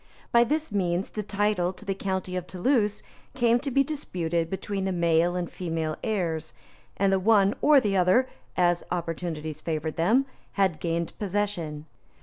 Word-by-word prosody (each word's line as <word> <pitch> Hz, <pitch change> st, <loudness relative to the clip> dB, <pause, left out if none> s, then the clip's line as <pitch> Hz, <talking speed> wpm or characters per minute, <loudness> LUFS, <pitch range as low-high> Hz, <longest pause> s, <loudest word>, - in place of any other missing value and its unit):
By 235 Hz, 0 st, +6 dB
this 305 Hz, +3 st, -1 dB
means 185 Hz, -2 st, 0 dB
the 215 Hz, -, -3 dB
title 205 Hz, -3 st, 0 dB
to 210 Hz, -, -11 dB
the 195 Hz, -, 0 dB
county 190 Hz, -1 st, -3 dB
of 180 Hz, -1 st, -3 dB
Toulouse 210 Hz, +2 st, +1 dB, 0.3 s
came 240 Hz, -1 st, +3 dB
to 280 Hz, +2 st, -3 dB
be 275 Hz, +1 st, +3 dB
disputed 170 Hz, -, -2 dB
between 195 Hz, +1 st, -3 dB
the 190 Hz, -, 0 dB
male 170 Hz, 0 st, +2 dB
and 180 Hz, -1 st, -1 dB
female 160 Hz, -3 st, -3 dB
heirs; 165 Hz, -8 st, -2 dB, 0.4 s
and 195 Hz, 0 st, +3 dB
the 190 Hz, -, +3 dB
one 200 Hz, 0 st, +4 dB
or 295 Hz, -1 st, +7 dB
the 205 Hz, -5 st, 0 dB
other, 190 Hz, +8 st, +4 dB, 0.3 s
as 175 Hz, -1 st, +3 dB
opportunities 165 Hz, -3 st, -4 dB
favored 155 Hz, -1 st, -3 dB
them, 225 Hz, +11 st, +3 dB, 0.3 s
had 195 Hz, -2 st, +3 dB
obtained 165 Hz, +1 st, -2 dB
possession. 185 Hz, -7 st, -2 dB
185 Hz, 160 wpm, -27 LUFS, 170-210 Hz, 0.4 s, or